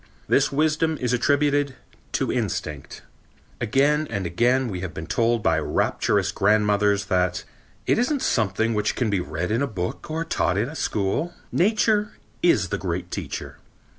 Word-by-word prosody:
This - - +3
wisdom 155 +2 +1
is 125 -1 0
attributed 145 +2 +2 0.4
to - - 0
instinct. 75 -2 -4 0.6
Again 145 +6 +2
and 100 -5 -3
again 120 +9 +2
we 95 -5 -4
have 90 -1 -6
been 80 - -5
told 115 +7 +1
by 80 -1 +3
rapturous - - 0
grandmothers 105 -1 +2
that: 90 -1 0 0.4
"It - - +2
isn't 265 +3 0
something 110 +1 +1
which 105 0 0
can 120 -4 0
be 100 - +1
read 85 +4 -3
in 115 +4 +1
a 140 - +1
book 95 - -5
or 160 +1 -2
taught 90 - 0
in 110 +6 0
a 155 - -9
school. 110 - -1 0.2
Nature 210 +2 +2 0.3
is 110 - +3
the - - -2
great 90 0 -3
teacher." - - -5
110 Hz, 160 wpm, -24 LUFS, 95-145 Hz, 0.6 s, This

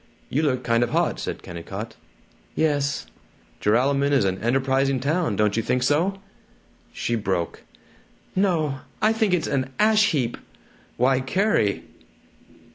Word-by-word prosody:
"You 145 - +1
look 130 -5 0
kind 115 -1 +2
of 120 - +1
hot," - - 0
said - - -5
Kennicott. 100 +6 -7 0.6
"Yes." 145 -3 0 0.6
"Joralemon 140 +6 +2
is 135 -7 +3
an 95 0 -1
enterprising 135 +2 +1
town, 150 - 0
don't 105 0 +1
you 115 - +1
think 125 +3 0
so?" 175 +9 +1 0.7
She 120 - -3
broke. 95 -6 -2 0.7
"No! 165 -8 +1 0.2
I 215 +1 +3
think 220 -3 +1
it's 175 -3 +1
an 130 -1 -1
ash 215 0 +4
heap." 125 -7 -1 0.6
"Why, 130 +1 +3
Carrie!" 135 - +1
135 Hz, 130 wpm, -24 LUFS, 115-160 Hz, 0.7 s, ash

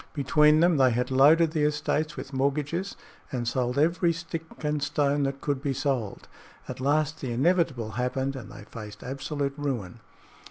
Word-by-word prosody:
Between 150 +2 +4
them 170 -2 +4
they 130 -1 +5
had 125 +2 -1
loaded 155 +5 +5
the 155 -2 -1
estates 150 +1 0
with 135 - -7
mortgages 150 +7 -1 0.4
and 120 -3 -3
sold 125 +1 -1
every 170 +3 +3
stick 165 0 -5 0.2
and 150 -1 0
stone 145 0 +1
that 135 0 -3
could 140 -2 -1
be 140 -2 -1
sold. 130 -6 -2 0.4
At - - -6
last 150 +3 0
the 130 - -3
inevitable 135 -4 +1
happened 130 +4 -2
and 130 - -8
they 105 - -10
faced 105 -1 -10
absolute 140 +2 -3
ruin. 125 -8 -4
140 Hz, 165 wpm, -27 LUFS, 130-150 Hz, 0.4 s, they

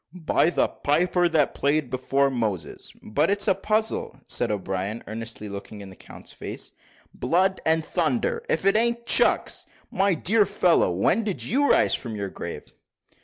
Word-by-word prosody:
"By 160 - +3
the - - +1
piper 175 +4 +1
that 155 -4 +1
played 145 -1 0
before 135 +2 +1
Moses, 105 -10 -3
but 145 - 0
it's 200 0 +2
a - - +5
puzzle," 215 -7 -1
said 120 - +1
O'Brien, 100 +2 -3
earnestly 115 0 -6
looking 100 +1 -8
in 95 -1 -10
the - - -13
count's - - -12
face. - - -7 0.4
"Blood 185 +8 +1
and 160 0 +2
thunder! 470 -2 -1
if 475 - 0
it 195 +1 +4
a'n't 235 +1 +2
Chucks! - - +2 0.2
my 195 -1 +2
dear 205 +5 +3
fellow, 185 - +2
when 100 - +1
did 205 -4 -3
you 285 +5 +1
rise - - +4
from 115 -3 -3
your 100 -2 -4
grave?" - - -8
155 Hz, 165 wpm, -24 LUFS, -, 0.4 s, a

